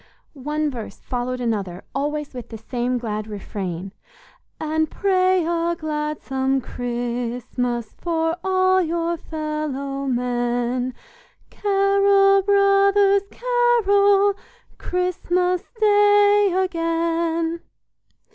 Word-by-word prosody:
One 300 +2 -2
verse 235 -4 -7
followed 250 0 -3
another 200 -7 -3
always 295 +1 -3
with 245 -2 -8
the 225 - -7
same 245 +3 -2
glad 215 -3 -4
refrain: 195 -3 -5 0.7
"And 315 0 0
pray 370 -3 +2
a 340 0 0
gladsome 300 -4 -2
Christmas 240 -1 -3
For 325 -1 0
all 375 0 +3
your 340 0 -1
fellow 300 -4 -4
men: 245 0 -1 0.6
Carol, 395 0 +3
brothers, 395 0 +4
carol, 410 -5 +3 0.5
Christmas 360 0 0 0.2
Day 410 -1 +5
again." 335 -2 0
320 Hz, 85 wpm, -22 LUFS, 250-385 Hz, 0.7 s, Day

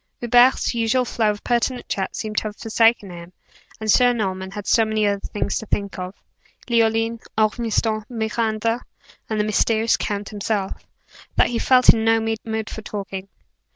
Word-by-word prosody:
Hubert's 245 +2 +4
usual 235 +2 +1
flow 220 -2 0
of 205 0 -3
pertinent 245 +1 0
chat 190 -1 -3
seemed 215 -1 -5
to - - +2
have 210 -1 -4
forsaken 225 -3 +2
him, 170 +1 -10 0.5
and 215 -1 +1
Sir 245 +2 +5
Norman 190 -4 -3
had 205 +1 -7
so 225 - +4
many 215 -1 0
other 200 -1 +1
things 205 - -3
to 220 - -9
think 200 -2 -2
of 185 +1 -6 0.5
Leoline, 225 -1 +1 0.2
Ormiston, 220 0 +1
Miranda, 225 0 -1 0.5
and 220 -1 -1
the - - +3
mysterious 220 +1 +2
count 205 -1 -3
himself 205 -1 -3 0.5
that - - +3
he 235 -1 -1
felt 255 0 +4
in 225 - -1
no 225 0 +4
mood 220 0 -3
for 220 - -7
talking. 195 -2 -6
220 Hz, 165 wpm, -22 LUFS, 205-230 Hz, 0.5 s, Sir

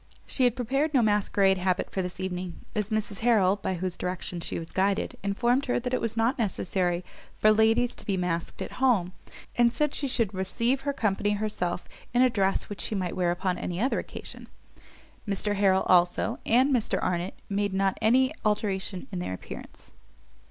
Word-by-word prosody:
She 260 - +2
had 245 -1 +3
prepared 275 +5 0
no 250 - +5
masquerade 200 -2 +3
habit 185 0 0
for 190 - -1
this 180 0 -5
evening, 180 -2 -4
as 210 -1 -1
Mrs 215 -2 -2
Harrel, 210 -5 +3
by 190 -2 -2
whose 180 0 -3
direction 180 -1 -4
she - - -4
was 165 -1 -7
guided, 195 +1 0
informed 240 +7 +1
her 245 - +1
it 250 +1 -1
was 225 0 -2
not 235 +4 +1
necessary 185 -4 0 0.3
for 215 - +5
ladies 225 +3 +3
to - - -7
be 195 -2 +1
masked 175 -2 -2
at - - -7
home, 200 -9 +3 0.5
and 235 -1 +5
said 300 +2 0
she 280 - -2
should 230 -6 0
receive 230 +8 0
her 285 +1 -1
company 205 -4 0
herself 200 -4 -2 0.3
in 245 - +6
a 255 - +4
dress 195 -3 +1
which 205 - -6
she 215 - -2
might 185 -3 -2
wear 180 -2 +1
upon 180 +1 -1
any 175 0 -3
other 255 +5 +1
occasion. - - -9 0.8
Mr 205 +1 0
Harrel, 195 -1 +3
also, 175 -1 +3
and 260 +5 +4
Mr 235 -4 +1
Arnott 180 +1 -1
made 200 0 0
not 195 0 +1
any 260 +5 +4
alteration 200 -2 -1
in 185 - -3
their 175 - -3
appearance. - - -11
200 Hz, 185 wpm, -27 LUFS, 185-235 Hz, 0.8 s, in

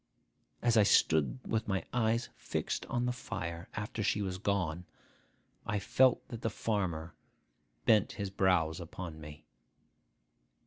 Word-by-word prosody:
As 120 -1 +4
I - - +8
stood 80 - +4
with 110 -1 -1
my 95 -4 -1
eyes 115 0 +1
fixed - - -3
on 120 0 0
the 125 - +1
fire, 85 -8 -5
after 105 +2 -3
she 105 0 +1
was 95 -1 -3
gone, 90 -4 -1 0.8
I 105 - -1
felt 125 +6 +3
that 115 -1 -6
the 115 - 0
farmer 90 -7 -2 0.7
bent 105 -3 +4
his 100 -2 -4
brows 90 -4 +2
upon 85 -2 -7
me. 75 0 -10
95 Hz, 135 wpm, -32 LUFS, 85-110 Hz, 0.8 s, I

